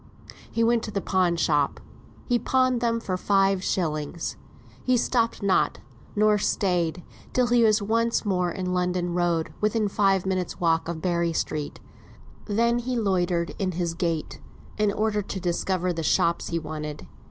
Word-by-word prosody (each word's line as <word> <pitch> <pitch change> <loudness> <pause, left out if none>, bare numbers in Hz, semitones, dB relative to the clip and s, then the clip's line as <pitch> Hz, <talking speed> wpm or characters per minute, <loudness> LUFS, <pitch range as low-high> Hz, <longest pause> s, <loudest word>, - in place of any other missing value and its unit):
He 230 - +1
went 235 0 +3
to - - -6
the 200 - -2
pawn 185 -3 +1
shop; 150 -4 +1 0.5
he 245 -1 +2
pawned 255 0 +2
them 230 -1 +1
for 185 -5 -3
five 195 0 +2
shillings; 160 -3 -2 0.5
he 255 -1 +3
stopped 230 -3 0
not, 195 -1 +2 0.4
nor 210 0 +4
stayed, 180 -4 0 0.3
till 250 - +3
he 240 0 +3
was 215 -1 +4
once 230 +2 +1
more 180 -3 +1
in 180 +1 -3
London 180 -1 0
Road, 170 -2 0
within 215 0 +1
five 195 -2 +2
minutes' 185 -2 -2
walk 165 -2 +2
of 165 -2 -5
Berry 170 -2 +1
Street 150 -2 -3 0.7
then 235 +3 +2
he 250 +1 -2
loitered 180 -5 0
in 190 -2 -1
his 170 -1 -1
gait, 165 -2 -3 0.3
in 210 -1 +2
order 210 0 0
to 195 -1 -5
discover 180 0 -1
the 165 - -3
shops 170 +2 +1
he 170 - -1
wanted. 155 -2 -6
185 Hz, 160 wpm, -25 LUFS, 170-215 Hz, 0.7 s, nor